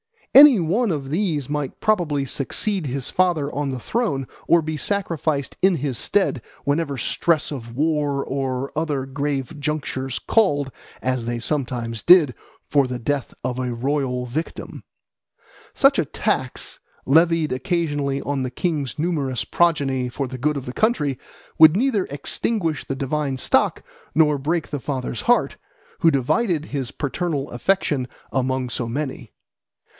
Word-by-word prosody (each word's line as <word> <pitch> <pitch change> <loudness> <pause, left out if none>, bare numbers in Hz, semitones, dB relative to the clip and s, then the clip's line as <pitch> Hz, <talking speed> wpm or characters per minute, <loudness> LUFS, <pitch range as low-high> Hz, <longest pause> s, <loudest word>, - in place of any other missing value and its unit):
Any 275 -5 +9
one 200 +7 +1
of 140 -4 -3
these 160 -6 0
might 145 -2 -3
probably 165 -10 +1
succeed 165 +7 -1
his 135 +1 -3
father 170 -6 +1
on 145 -1 -1
the 130 -1 -3
throne 145 - -1 0.2
or 170 - +5
be 155 0 -3
sacrificed 160 -6 -1
in 190 -1 +4
his 140 -5 -2
stead 190 - +1 0.2
whenever 145 -1 0
stress 155 +6 0
of 120 -5 -7
war 145 -1 0
or 135 0 -2
other 150 -4 -1
grave 140 +1 -3
junctures 140 -3 -2
called, 145 -11 +1 0.3
as 130 -2 -1
they 120 0 -2
sometimes 120 -4 -2
did, 165 -8 +6 0.3
for 140 -3 +3
the 125 0 -3
death 135 +3 -2
of 125 0 -2
a 125 -1 -2
royal 125 0 -1
victim. 150 +7 -5 0.9
Such - - +4
a - - +2
tax, - - -2 0.3
levied 165 +2 +3
occasionally 145 -2 -1
on 140 -1 -2
the 130 - -2
king's 150 0 -2
numerous 150 -6 -1
progeny 140 -7 +1
for 135 +2 -3
the 130 0 -7
good 150 +4 +1
of 135 - -5
the 125 - -6
country, 150 - +1 0.4
would 160 +1 +9
neither 225 -3 +1
extinguish 160 +3 -1
the 135 - -3
divine 140 0 -2
stock - - +1 0.3
nor 150 -2 +4
break 160 +4 -1
the 145 - -3
father's 130 -3 -4
heart, 245 0 +2 0.4
who 165 - +5
divided 155 - +1
his 135 -4 -3
paternal 145 0 -3
affection 145 -2 0 0.2
among 130 -1 -1
so 120 -1 -3
many. 135 +3 -4
145 Hz, 145 wpm, -22 LUFS, 130-165 Hz, 0.9 s, Any